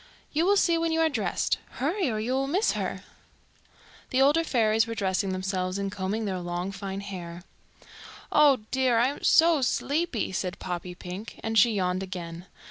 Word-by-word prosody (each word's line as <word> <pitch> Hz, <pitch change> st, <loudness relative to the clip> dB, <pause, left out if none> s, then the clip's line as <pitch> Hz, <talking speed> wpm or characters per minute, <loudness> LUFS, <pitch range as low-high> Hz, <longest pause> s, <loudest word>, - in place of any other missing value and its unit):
"You 320 Hz, +4 st, +1 dB
will 405 Hz, +1 st, +4 dB
see 340 Hz, -3 st, +3 dB
when 330 Hz, 0 st, 0 dB
you 325 Hz, -, +1 dB
are 320 Hz, -, +4 dB
dressed. 215 Hz, -, -1 dB
Hurry, 325 Hz, +5 st, -1 dB
or 220 Hz, -, -2 dB
you 235 Hz, +4 st, -1 dB
will 270 Hz, +1 st, 0 dB
miss 375 Hz, +10 st, +2 dB
her." -, -, -3 dB
[Illustration: -, -, -28 dB
"The 260 Hz, -, +2 dB
older 295 Hz, +4 st, +4 dB
fairies 225 Hz, -6 st, +2 dB
were 230 Hz, -, -4 dB
dressing 195 Hz, -2 st, 0 dB
themselves 185 Hz, 0 st, -2 dB
and 200 Hz, 0 st, -2 dB
combing 205 Hz, +3 st, -2 dB
their 190 Hz, -2 st, -2 dB
long 175 Hz, +2 st, -3 dB
fine 195 Hz, 0 st, -5 dB
hair."] 175 Hz, -3 st, -7 dB, 0.9 s
"Oh 285 Hz, -5 st, +5 dB
dear! 260 Hz, -3 st, +2 dB
I 240 Hz, +3 st, +4 dB
am 285 Hz, -, -8 dB
so 325 Hz, -2 st, +5 dB
sleepy," 285 Hz, -, 0 dB
said 180 Hz, 0 st, -3 dB
Poppypink, 180 Hz, +3 st, -6 dB
and 225 Hz, 0 st, -2 dB
she 225 Hz, +2 st, +5 dB
yawned 185 Hz, -2 st, 0 dB
again. 180 Hz, -2 st, -7 dB
215 Hz, 180 wpm, -27 LUFS, 185-275 Hz, 0.9 s, Oh